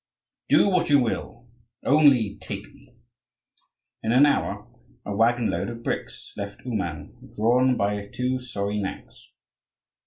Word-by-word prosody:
"Do - - +5
what 180 -3 +1
you 145 - +6
will, 120 -1 -3 0.4
only 135 -8 +4
take - - -6
me!" - - -22 1.1
In 110 - -1
an 130 +4 +6
hour, 145 - 0 0.4
a 100 - -3
waggon 115 +2 +2
load - - -2
of 115 0 -8
bricks - - -5
left 100 +3 -7
Ouman, 95 -11 -5
drawn 125 +4 +3
by 100 0 -1
two 125 +4 -2
sorry 105 -4 -3
nags. 95 -1 -7
115 Hz, 130 wpm, -25 LUFS, 105-130 Hz, 1.1 s, you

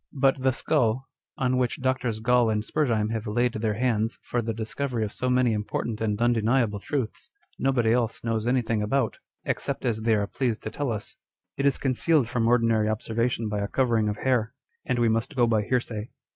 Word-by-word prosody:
But 135 -1 +2
the 130 0 +3
skull, 120 0 +1 0.3
on 130 -1 +1
which 125 -2 0
Drs. 130 -4 -1
Gall 125 0 +3
and 105 -1 0
Spurzheim 115 -8 0
have 115 -1 -3
laid 120 +3 +1
their 110 -1 -1
hands 115 -1 0
for 120 - -1
the 115 0 -2
discovery 115 +2 -3
of 100 - -6
so 125 +2 -2
many 125 -2 +3
important 105 +1 -3
and 105 -1 0
undeniable 115 -2 +2
truths, 125 +1 -4 0.3
nobody 125 -4 +2
else 120 -2 -1
knows 115 -1 -1
anything 120 -3 +1
about, 115 +2 0 0.3
except - - -2
as 110 -3 0
they 110 0 +3
are 100 -1 +1
pleased 120 +1 -2
to - - -4
tell 145 -4 -2
us. 105 -2 -6 0.4
It 140 - +1
is 140 - +2
concealed 135 +1 +2
from 120 -1 0
ordinary 115 -3 +3
ob 110 0 -1
servation 115 0 -1
by 105 -1 -2
a 100 - -1
covering 115 -3 +1
of 105 - -3
hair, 125 -1 0 0.3
and 125 - +1
we 120 -1 +3
must 115 +6 0
go 120 -2 +4
by 110 -2 +2
hearsay. 115 -1 -2
115 Hz, 200 wpm, -26 LUFS, 110-125 Hz, 0.4 s, go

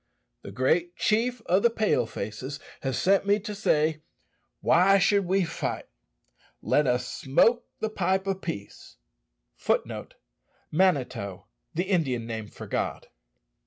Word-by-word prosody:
The - - -9
great 170 +7 +1
chief 230 +2 +1
of 185 +3 +3
the 235 - +5
Pale 215 - +1
faces 120 +8 -6 0.2
has 135 -2 -2
sent 195 +1 +3
me 205 +1 +4
to 210 0 -5
say, 155 -6 +1 0.6
Why 190 +4 +5
should 200 +1 +3
we 190 +2 +2
fight? 165 0 -4 0.7
let 150 -2 +2
us 125 0 +1
smoke 230 - +2
the 220 - 0
pipe 190 -1 0
of 195 -1 -2
peace." 100 - -7 0.6
[Footnote - - -2 0.3
*: - - -40
The 135 - 0 0.4
Indian 155 - 0
name 110 -2 -5
for - - -10
God. - - -3
175 Hz, 130 wpm, -27 LUFS, 130-200 Hz, 0.7 s, the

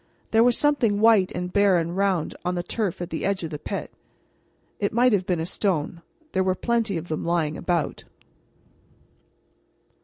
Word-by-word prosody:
There 225 0 +5
was 245 -1 +4
something 245 -9 +2
white 220 -4 +5
and 180 +1 -4
bare 200 -2 +4
and 170 +1 -2
round 190 -4 0
on 180 +1 -1
the 175 - -2
turf 195 -3 -2
at 175 - -8
the 160 - -3
edge 195 -2 -1
of 165 - -5
the 150 - -5
pit. - - -5 0.9
It 200 - -1
might 245 +1 +4
have 185 -3 +1
been 180 -3 0
a 160 - -2
stone; 170 -3 -1 0.3
there 190 - +1
were 185 0 +1
plenty 230 -3 0
of 165 +1 -6
them 155 - -3
lying 165 -3 0
about. 170 -3 -2
185 Hz, 180 wpm, -24 LUFS, 170-205 Hz, 0.9 s, There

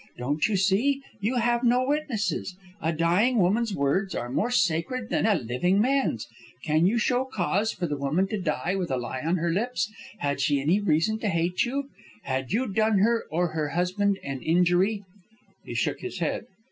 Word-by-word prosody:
Don't 145 +5 0
you 210 -2 0
see? 225 +10 +2 0.2
You 215 +6 -1
have 240 0 +1
no 250 +1 +3
witnesses. 270 -10 -1 0.3
A 160 - +1
dying 175 +10 +2
woman's 210 +3 +2
words 165 +8 0
are 120 +1 -4
more 210 - 0
sacred 225 +4 0
than - - +2
a 215 - +4
living 155 - 0
man's. 255 - +1 0.4
Can 155 +2 +3
you 225 +5 +2
show 245 +3 +2
cause 215 -3 0
for 180 - -3
the 150 -3 -2
woman 155 +8 +1
to 215 -3 -2
die 160 +1 -1
with 180 -3 -2
a 130 - 0
lie 125 +1 -4
on 165 +5 0
her 170 0 0
lips? 220 +3 -1 0.3
Had 145 -5 -1
she 145 -2 +2
any 160 +9 +2
reason 205 +3 +1
to 220 - -1
hate 170 0 +1
you? 275 +3 -3 0.3
Had 130 -1 -3
you 235 +6 +1
done 215 0 +2
her 230 +4 +2
or 175 +2 0
her 155 -2 -2
husband 185 +4 0
an 135 -2 -5
injury?" 180 +5 +2 0.6
He - - -7
shook - - 0
his - - -6
head. - - -2
190 Hz, 190 wpm, -26 LUFS, 160-225 Hz, 0.6 s, a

